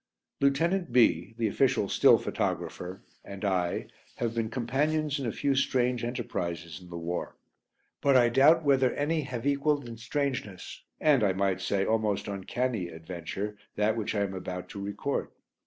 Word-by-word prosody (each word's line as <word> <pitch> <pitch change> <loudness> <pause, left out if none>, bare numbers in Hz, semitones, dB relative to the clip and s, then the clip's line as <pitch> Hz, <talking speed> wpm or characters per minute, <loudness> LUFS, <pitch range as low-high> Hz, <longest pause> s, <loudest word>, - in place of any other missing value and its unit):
Lieutenant 170 +6 +2
B, 110 -4 +3
the 115 - 0
official 125 -1 +2
"still" - - +6
photographer, 90 +1 -3 0.2
and 100 +1 -7
I 90 -3 0 0.3
have 115 -1 -2
been 115 -1 -1
companions 145 +6 0
in 135 - -2
a - - 0
few 140 +4 0
strange 125 -2 +1
enterprises 85 -8 -4
in 90 - -13
the 85 - -6
war, 85 +1 -4 0.6
but 140 -2 +5
I 120 -1 +5
doubt 145 +7 +5
whether 135 -3 +4
any 155 +2 0
have 125 -3 -5
equalled 145 -1 +1
in 115 -1 -8
strangeness, 120 -5 -3 0.2
and 145 -7 +4
I 95 -2 +3
might 95 -1 0
say 95 -1 0
almost 110 -3 0
uncanny, 105 +1 -2
adventure 85 +5 -6 0.2
that 105 +1 +2
which 110 -1 -2
I 100 - +1
am 100 -1 -1
about 90 -1 -5
to 100 - -7
record. 100 +8 -2
115 Hz, 160 wpm, -29 LUFS, 95-135 Hz, 0.6 s, still